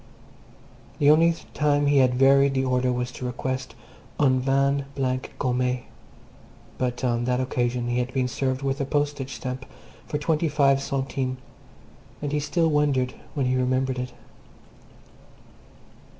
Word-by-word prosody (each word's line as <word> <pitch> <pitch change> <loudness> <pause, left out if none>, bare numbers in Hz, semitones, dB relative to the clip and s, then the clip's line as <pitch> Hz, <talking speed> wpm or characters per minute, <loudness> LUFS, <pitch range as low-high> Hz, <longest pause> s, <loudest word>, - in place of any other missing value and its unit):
The 145 0 +5
only 165 +2 +5 0.2
time 145 -1 +2
he 145 -1 +4
had 125 -1 +4
varied 135 +1 +5
the 130 0 +1
order 125 0 +1
was 125 0 -2
to 125 - -7
request 130 -1 -4 0.4
"un 130 -3 +4
vin 140 +1 +1
blanc 130 -1 -2
gommée," 125 -1 0 1.0
but 125 -1 -2
on 120 -1 +1
that 125 0 +1
occasion 125 -1 -1
he 120 +1 0
had 125 +1 -2
been 130 -1 0
served 130 +2 -2
with 135 +1 -1
a - - 0
postage 145 -2 -2
stamp 130 0 -5 0.4
for 150 - -2
twenty 155 +2 0
five 140 -2 +3
centimes, 135 -1 -2 0.8
and 145 -1 -3
he 150 - +1
still 165 +3 +1
wondered 145 -4 +1 0.2
when 140 -3 0
he 125 0 +1
remembered 130 0 0
it. 125 0 -4
130 Hz, 145 wpm, -25 LUFS, 125-140 Hz, 1.0 s, The